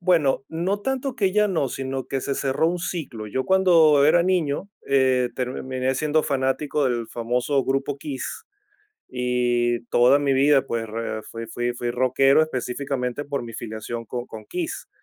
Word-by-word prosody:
Bueno, 160 -7 +2
no 180 +5 -1
tanto 265 +2 -2
que 195 -4 +1
ya 210 +1 +3
no, 160 -8 0
sino 135 0 -4
que 135 - -2
se 140 +1 -2
cerró 135 +4 +1
un 180 +1 -2
ciclo. 155 -11 -5
Yo 130 +5 -2
cuando 165 -6 +5
era 170 +3 +5
niño, 180 -1 0 0.2
eh, 130 -2 +3
terminé 130 0 -2
siendo 155 +3 +1
fanático 140 +2 0
del 120 -3 0
famoso 125 +4 0
grupo 135 +1 -1
KISS, 140 -2 -5 0.6
y 120 -1 0
toda 125 +3 +4
mi 145 -1 +1
vida, 135 +1 +4
pues, 115 -2 -2
re 110 0 -4
fui 115 +1 -8
fui 120 +2 -2
fui 120 0 -3
rockero 130 +4 +4
específicamente 130 -1 -3
por 140 -1 -3
mi 115 - -8
filiación 115 +1 -6
con 120 +2 -5
con 110 -1 -10
KISS. 350 -3 -4
135 Hz, 165 wpm, -23 LUFS, 125-155 Hz, 0.6 s, cuando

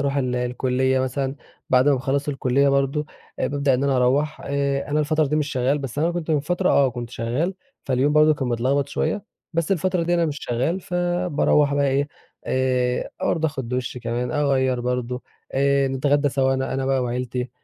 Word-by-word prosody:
أروح 140 0 0
ال 125 -2 0
الكُلّية 125 +1 0
مثلًا. 135 +1 -2 0.3
بعد 130 +2 +5
ما 145 - +5
باخلص 140 +2 -1
الكُلّية 135 0 +2
برضو 140 +2 +1 0.3
بابدأ 140 -2 +1
إن 135 +2 0
أنا 135 -2 +2
أروّح. 145 +5 +1
آآ، 140 0 -1
أنا 150 - +2
الفترة 155 +1 +1
دي 150 +2 0
مش 150 -1 0
شغال، 130 +3 +1
بس 135 -1 -5
أنا 165 +3 +2
كنت 170 -2 -4
من 150 -2 +3
فترة 180 +5 0
آه 135 -2 +4
كنت 120 -1 -6
شغال، 125 +11 -2 0.3
فاليوم 135 +2 +2
برضو 155 0 +5
كان 135 -3 -3
متلخبط 130 +4 0
شويّة، 160 +8 -1 0.3
بس 165 +3 0
الفترة 185 0 0
دي 175 +1 +1
أنا 170 -1 +2
مش 145 -2 -3
شغال 130 +10 -1
فباروّح 175 -5 +1
بقى 140 0 +2
إيه 140 +2 +1 0.4
آآ، 125 -1 0
برضو 160 -1 +1
آخد 135 -6 -4
دُش 125 0 -3
كمان، 120 +1 -3
أغيّر 130 -4 +1
برضو 125 0 -2 0.3
آآ، 140 0 +2
نتغدى 145 +2 +2
سوا 135 -1 +1
أنا 130 0 -2
أنا 135 0 -1
بقى 135 -1 +1
وعيلتي 125 0 -3
140 Hz, 185 wpm, -23 LUFS, 125-150 Hz, 0.4 s, بعد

